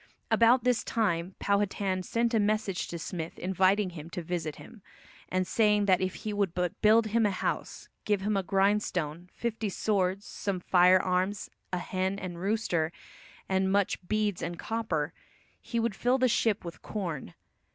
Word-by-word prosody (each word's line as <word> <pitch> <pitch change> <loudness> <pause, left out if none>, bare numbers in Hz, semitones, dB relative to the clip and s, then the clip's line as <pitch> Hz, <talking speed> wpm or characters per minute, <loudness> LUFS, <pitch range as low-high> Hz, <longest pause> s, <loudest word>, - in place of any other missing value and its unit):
About 235 +1 +5
this 250 -2 +2
time 185 -5 -1
Powhatan 200 -2 0
sent 235 +5 0
a 225 - +4
message 210 -2 0
to 170 - -5
Smith 165 -1 -5
inviting 190 +2 +2
him 165 -1 -9
to 175 -1 -5
visit 160 -3 -3
him, 230 -3 -13 0.5
and 185 0 0
saying 210 0 +3
that 185 -2 +4
if 185 0 -1
he 215 - -1
would 200 -4 0
but 180 -1 -2
build 220 +1 +5
him 225 +2 +2
a 210 - +4
house, 190 - -3 0.2
give 205 -2 +1
him 210 +1 0
a 195 - +2
grindstone, 185 -3 0
fifty 225 -2 -3
swords, 195 -1 0
some 200 -2 -3
firearms, 185 +2 +3 0.2
a 180 - 0
hen 185 +2 -2
and 175 -3 -6
rooster, 185 -5 0 0.6
and 190 0 +1
much 200 -1 +1
beads 210 -2 0
and 170 - -4
copper, 175 -10 -2 0.5
he 235 - -2
would 230 -2 0
fill 245 +6 +2
the 255 -1 +3
ship 220 -4 +1
with 170 - -8
corn. 165 - -5
195 Hz, 165 wpm, -29 LUFS, 180-215 Hz, 0.6 s, About